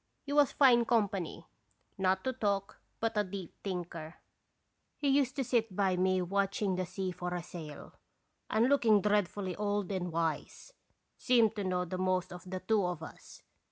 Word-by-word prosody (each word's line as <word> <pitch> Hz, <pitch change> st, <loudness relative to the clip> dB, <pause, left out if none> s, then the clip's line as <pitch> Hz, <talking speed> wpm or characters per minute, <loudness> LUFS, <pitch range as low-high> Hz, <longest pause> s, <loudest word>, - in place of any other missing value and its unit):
He 285 Hz, -, -4 dB
was 290 Hz, -2 st, +5 dB
fine 245 Hz, -4 st, +5 dB
company, 200 Hz, -8 st, 0 dB, 0.5 s
not 190 Hz, 0 st, +1 dB
to 260 Hz, -, -1 dB
talk, 200 Hz, -4 st, -1 dB, 0.2 s
but 225 Hz, 0 st, -1 dB
a 210 Hz, -, +3 dB
deep 190 Hz, -2 st, -7 dB
thinker; 175 Hz, -4 st, -5 dB, 0.8 s
he 290 Hz, -, -1 dB
used 270 Hz, -1 st, +2 dB
to 275 Hz, -, 0 dB
sit 225 Hz, -5 st, 0 dB
by 190 Hz, -2 st, +2 dB
me 185 Hz, 0 st, +2 dB
watching 195 Hz, +1 st, 0 dB
the 185 Hz, -1 st, -2 dB
sea 185 Hz, +1 st, -3 dB
for 180 Hz, 0 st, -4 dB
a 175 Hz, -, -4 dB
sail, 160 Hz, -4 st, -9 dB, 0.6 s
and 220 Hz, +3 st, +3 dB
look 280 Hz, +1 st, +3 dB, 0.2 s
dreadfully 205 Hz, -2 st, 0 dB
old 205 Hz, -2 st, -1 dB
and 180 Hz, -2 st, -2 dB
wise 165 Hz, -, -3 dB, 0.5 s
seemed 230 Hz, -4 st, +4 dB
to 205 Hz, -, -2 dB
know 180 Hz, -1 st, 0 dB
the 185 Hz, +1 st, -5 dB
most 185 Hz, -1 st, 0 dB
of 180 Hz, +1 st, -10 dB
the 185 Hz, 0 st, -4 dB
two 210 Hz, +1 st, +2 dB
of 180 Hz, -3 st, -2 dB
us. -, -, -12 dB
190 Hz, 170 wpm, -32 LUFS, 180-220 Hz, 0.8 s, was